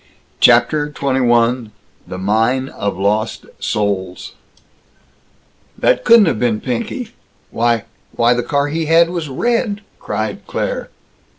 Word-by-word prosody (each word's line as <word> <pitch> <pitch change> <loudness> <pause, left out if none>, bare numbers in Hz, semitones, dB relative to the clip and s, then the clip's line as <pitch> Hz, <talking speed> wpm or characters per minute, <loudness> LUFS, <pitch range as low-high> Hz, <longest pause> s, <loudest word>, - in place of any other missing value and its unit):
CHAPTER 150 -1 +4
XXI 125 -4 +1 0.4
THE 90 - -6
MINE 115 +7 +1
OF 100 -3 -4
LOST 105 +3 -1
SOULS 95 -3 -2 1.5
"That - - +2
couldn't 230 -2 +7
have 160 -11 0
been 115 -3 +1
Pinky! 225 - -4 0.4
Why! 115 -1 +1 0.3
Why, 120 +1 +3
the 120 - 0
car 140 +2 0
he 160 +1 -2
had 165 +1 +4
was 170 -4 -4
red," 220 - -1 0.2
cried - - -4
Claire. - - -3
130 Hz, 115 wpm, -17 LUFS, 110-165 Hz, 1.5 s, couldn't